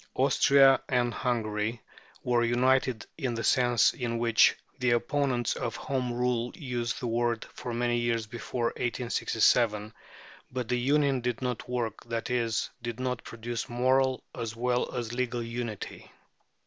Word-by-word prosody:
Austria 135 -1 +5
and 120 -2 +1
Hungary 115 -2 -1 0.4
were 120 -1 +2
united 125 -1 +2
in 130 -5 -1
the 115 - -3
sense 120 -4 +4
in 120 -2 -3
which 115 -1 +4 0.2
the 125 -1 +2
opponents 120 0 +1
of 120 -1 -3
Home 130 -3 -2
Rule 120 0 0
use 120 -5 -2
the - - -6
word 120 0 0
for 125 - -6
many 120 0 0
years 115 -1 0
before 120 +2 -2
1867, 115 -3 +1 0.6
but 125 -2 -3
the 125 0 0
union 140 0 +2
did 125 +1 -2
not 125 -1 -3
work, 120 -4 -2
that 115 0 -3
is, 120 -2 0
did 120 0 -5
not 125 -2 -2
produce 115 +1 -5
moral 130 +2 +2
as 110 -1 -5
well 125 +1 0
as 120 -2 -3
legal 120 -1 -1
unity. 115 -2 -6
120 Hz, 145 wpm, -29 LUFS, 115-125 Hz, 0.6 s, Austria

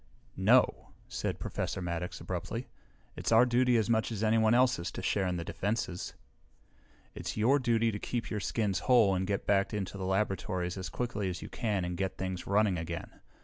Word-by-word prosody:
"No," 115 +7 +3
said - - -3
Professor - - -3
Maddox 90 0 -4
abruptly. - - -4 0.5
"It's - - -3
our 115 +2 +7
duty 125 0 +3
as 110 - +1
much 110 0 +1
as 110 -1 -3
anyone 110 +1 +4
else's 125 -8 +3
to - - -5
share 95 0 +1
in 90 - -1
the 85 - -3
defenses." 100 0 -3 1.0
"It's - - -5
your 125 +7 +4
duty 115 -2 +2
to 105 - -4
keep 120 +2 -3
your 105 - -1
skins 105 -1 0
whole 115 -6 +6
and 95 0 -1
get 100 0 -1
back 100 0 +2
into 100 -1 -4
the 95 - -3
laboratories 95 -2 -1
as 95 -2 -5
quickly 105 -1 -2
as 90 - -5
you - - -8
can 105 -6 -1
and 90 0 -3
get 95 +1 -2
things 95 -2 -4
running 100 -3 +2
again! 85 +1 -6
100 Hz, 190 wpm, -31 LUFS, 95-115 Hz, 1.0 s, our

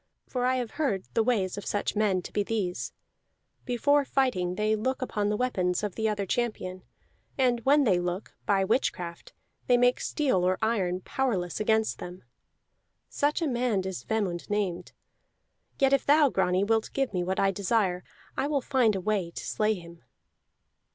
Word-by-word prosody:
For 250 -1 -1
I 255 - +2
have 245 -3 -2
heard 200 -11 0
the 225 - +3
ways 205 -5 0
of 200 - -10
such 205 - -1
men 200 -4 +1
to - - -9
be 205 - +1
these: 200 -4 -2 0.7
before 285 +4 +3
fighting 245 -11 0
they 215 +1 +1
look 260 +5 -1
upon 210 -5 -1
the 210 - 0
weapons 185 -7 0
of 205 -3 -2
the 220 +2 0
other 205 -2 -1
champion, 190 -4 -2 0.6
and 250 -3 +2
when 285 +2 +5
they 190 -8 +3
look, 175 +3 -4
by 195 -2 +3
witchcraft 175 -5 -2 0.3
they 245 - +5
make 245 0 +3
steel 260 - 0
or 185 +1 +2
iron 190 -5 0
powerless 190 - -1
against 220 +1 +1
them. 180 +1 -8 0.9
Such 295 +4 0
a - - +1
man 240 -6 +1
is 190 -2 -4
Vemund 200 -6 -2
named. 190 -4 -2 0.9
Yet 270 0 +3
if 275 - +3
thou, 295 0 +6
Grani, 190 -3 +1
wilt 220 +1 +1
give 270 -5 -1
me 180 -1 0
what 185 +2 -1
I 195 0 +3
desire, 195 -2 0 0.3
I 280 - 0
will 290 -1 +1
find 250 -6 +2
a 190 - -2
way 200 -3 0
to - - -7
slay 215 0 +1
him." 170 -2 -12
210 Hz, 175 wpm, -28 LUFS, 185-250 Hz, 0.9 s, thou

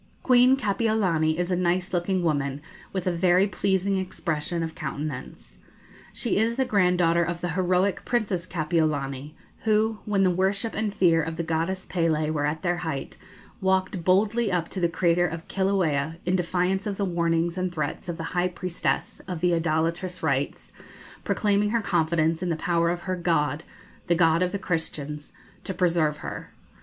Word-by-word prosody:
Queen 255 +1 +5
Kapiolani 195 -8 +1
is 175 +1 -1
a - - +3
nice 180 +1 0
looking 180 +1 0
woman, 140 -4 0 0.3
with 190 -2 -3
a 180 - +2
very 180 +2 +3
pleasing 195 0 0
expression 170 -2 -2
of 160 0 -4
countenance. 145 -2 -6 0.5
She 235 - -1
is 225 +2 +2
the 265 +1 +1
granddaughter 180 -6 +3
of 170 +1 -3
the 175 - -2
heroic 185 +3 +1
Princess 200 -7 -1
Kapiolani, 155 -4 -1 0.2
who, 220 0 +1
when 200 -2 +2
the 185 - +4
worship 195 +5 0
and 215 -1 -1
fear 170 -4 +3
of 165 +1 -4
the 170 - -2
goddess 165 +4 -1
Pélé 160 -3 0
were 145 -2 0
at 155 +1 -3
their 175 -1 +1
height, 160 -6 -4 0.5
walked 190 -1 +1
boldly 205 +4 +2
up 175 -2 -1
to 190 - -5
the 170 -1 +2
crater 175 0 +2
of 165 0 -7
Kilauea, 170 -6 0
in 180 +1 +2
defiance 185 +3 0
of 200 -2 -3
the 200 - 0
warnings 170 -1 0
and 185 -1 -1
threats 170 +2 -4
of 170 - -3
the 165 - -5
high 180 0 +2
priestess 180 -1 -2
of 180 -3 -4
the 175 +1 +2
idolatrous 165 +3 -1
rites, 140 -2 -1 0.5
proclaiming 205 0 +1
her 230 +2 +1
confidence 165 -3 +1
in 180 - -1
the 165 - +1
power 170 0 +1
of 175 0 -2
her 185 +1 -2
God, 160 -3 0 0.5
the 170 - +3
God 165 0 +3
of 180 0 +1
the 200 - -1
Christians, 150 -5 -3 0.3
to 190 - -5
preserve 165 -4 +2
her. - - -6
175 Hz, 170 wpm, -26 LUFS, 165-190 Hz, 0.5 s, Queen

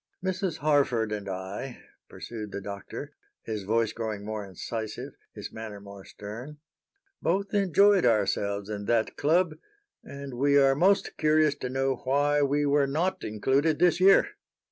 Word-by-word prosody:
"Mrs. 185 -3 -1
Harford 135 -7 +2
and 100 -2 -4
I," 95 +7 -5 0.3
pursued 110 -3 -7
the 100 - -4
Doctor, 100 0 -7 0.3
his 110 -2 -4
voice 115 +2 +1
growing 110 -3 -4
more 110 -1 -4
incisive, 110 +3 -6 0.2
his - - -7
manner 110 -2 -7
more 100 -1 -12
stern, 115 +9 -9 0.6
"both 195 +4 0
enjoyed 200 0 +4
ourselves 100 -2 +1
in 105 -1 -5
that 115 0 +1
club, 165 +3 +2 0.5
and 140 -1 -8
we 140 +3 +3
are 135 -1 +5
most 190 +8 +2
curious 155 -1 +3
to 125 - -4
know 135 0 0
why 145 +3 +1
we 145 +1 +2
were 145 0 +3
not 170 +7 -1
included 135 +8 +1
this 175 +1 +3
year." 195 - +6
135 Hz, 145 wpm, -27 LUFS, 105-155 Hz, 0.6 s, year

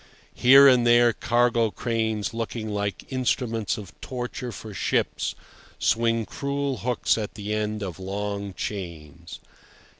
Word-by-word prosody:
Here 135 +3 +8
and 125 -3 +5
there 120 0 +5
cargo 120 0 +2
cranes 110 -1 -2
looking 115 -1 -4
like 100 -2 -3
instruments 120 -3 0
of 100 -3 -9
torture 125 -1 -5
for 110 -1 -9
ships - - -1 0.4
swing 115 -1 +1
cruel 140 0 -2
hooks 120 -1 0
at 105 -1 -5
the 105 0 -4
end 105 0 -2
of 95 -2 -6
long 100 0 -4
chains. 85 -4 -7
110 Hz, 125 wpm, -25 LUFS, 100-120 Hz, 0.4 s, Here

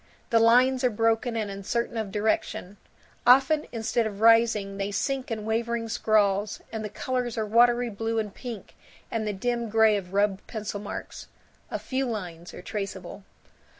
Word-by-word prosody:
The 230 - +5
lines 250 +3 +4
are 250 - +4
broken 225 +2 +1
and 210 -2 -2
uncertain 215 +5 -3
of 220 -3 -3
direction; 205 -2 -1 0.5
often 270 +5 +5
instead 230 0 0
of 205 -2 -7
rising 225 -3 +4
they 200 0 -2
sink 260 +6 -2
in 220 -2 -4
wavering 230 +1 -1
scrawls; 205 -2 +1
and 220 -1 -4
the 210 - -4
colors 250 +1 -3
are 220 - 0
watery 240 +2 +3
blue 225 +2 -2
and 210 -2 -2
pink 235 -6 -8 0.4
and 220 -2 -2
the - - 0
dim 235 +3 -2
gray 220 0 +4
of 180 -2 -7
rubbed 200 0 0
pencil 215 -2 -5
marks. 205 - -7 0.4
A - - -2
few 265 0 -2
lines 175 -7 -6
are - - -10
traceable. 195 -2 -6
220 Hz, 165 wpm, -26 LUFS, 205-235 Hz, 0.5 s, The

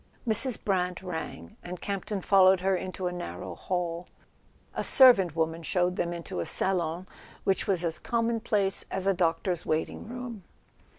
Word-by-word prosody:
Mrs. 230 +3 +1
Brant 180 -2 0
rang, 160 - -6
and 180 0 -7
Campton 200 0 -3
followed 190 -1 +5
her 190 +1 +2
into 185 0 -4
a 180 - 0
narrow 175 0 -6
hall. 175 -1 -3 0.7
A - - -2
servant 195 - +6
woman 165 0 -1
showed 180 +2 0
them 175 -1 -1
into 170 - -5
a 85 - -2
salon 175 -2 0 0.4
which 195 - +1
was 180 -3 +1
as 165 -1 -2
commonplace 225 -4 +1
as 190 0 -2
a 195 - +4
doctor's 175 0 0
wait¬ 155 0 0
ing - - -9
room. 240 -4 -7
185 Hz, 160 wpm, -28 LUFS, 170-195 Hz, 0.7 s, servant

